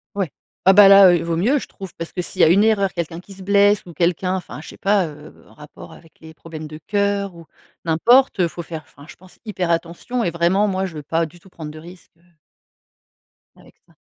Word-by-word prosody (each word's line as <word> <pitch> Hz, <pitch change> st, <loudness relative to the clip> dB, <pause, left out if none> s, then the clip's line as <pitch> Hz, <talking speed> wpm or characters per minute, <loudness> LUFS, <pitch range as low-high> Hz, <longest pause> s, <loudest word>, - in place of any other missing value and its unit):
Ouais. 190 Hz, -7 st, -2 dB, 0.3 s
Ah 190 Hz, -, +7 dB
bah 200 Hz, 0 st, +8 dB
là, 195 Hz, -1 st, +8 dB
heu, -, -, +4 dB
il -, -, -4 dB
vaut 165 Hz, 0 st, -2 dB
mieux, 250 Hz, +11 st, +2 dB
je -, -, -9 dB
trouve! 190 Hz, -2 st, -11 dB
Parce 165 Hz, 0 st, -7 dB
que 180 Hz, -, -4 dB
s'il -, -, -4 dB
y -, -, +7 dB
a -, -, +7 dB
une 190 Hz, +6 st, +4 dB
erreur, 205 Hz, -3 st, +2 dB
quelqu'un 170 Hz, -1 st, -5 dB
qui 195 Hz, +2 st, -14 dB
se 190 Hz, 0 st, -12 dB
blesse 200 Hz, +1 st, +3 dB
ou 175 Hz, -, -12 dB
quelqu'un 180 Hz, +3 st, 0 dB
enfin 185 Hz, -5 st, -7 dB
je -, -, -12 dB
sais -, -, -13 dB
pas, 200 Hz, -1 st, +1 dB
heu, 150 Hz, 0 st, -14 dB
en -, -, -20 dB
rapport 150 Hz, -1 st, -13 dB
avec 165 Hz, -, -18 dB
les 160 Hz, 0 st, -13 dB
problèmes 160 Hz, -1 st, -10 dB
de 155 Hz, 0 st, -10 dB
cœur 200 Hz, -2 st, -1 dB
ou 165 Hz, -1 st, -13 dB, 0.4 s
n'importe. 230 Hz, +10 st, +3 dB
Heu, 175 Hz, -, +3 dB
faut 170 Hz, -, -8 dB
faire 160 Hz, -1 st, -7 dB
enfin 145 Hz, -, -17 dB
je -, -, -13 dB
pense, 185 Hz, 0 st, -20 dB
hyper 185 Hz, -5 st, -3 dB
attention 170 Hz, +9 st, -3 dB
et 175 Hz, -, -1 dB
vraiment, 175 Hz, +5 st, +1 dB
moi, 190 Hz, -1 st, -1 dB
je 165 Hz, -, -11 dB
veux 150 Hz, -, -7 dB
pas 165 Hz, +3 st, -1 dB
du 175 Hz, +3 st, -18 dB
tout 190 Hz, -, -20 dB
prendre 160 Hz, -4 st, -9 dB
de 155 Hz, -, -11 dB
risque, 175 Hz, +3 st, -15 dB
heu -, -, -31 dB, 1.3 s
avec -, -, -20 dB
ça. -, -, -27 dB
180 Hz, 250 wpm, -20 LUFS, 165-200 Hz, 1.3 s, bah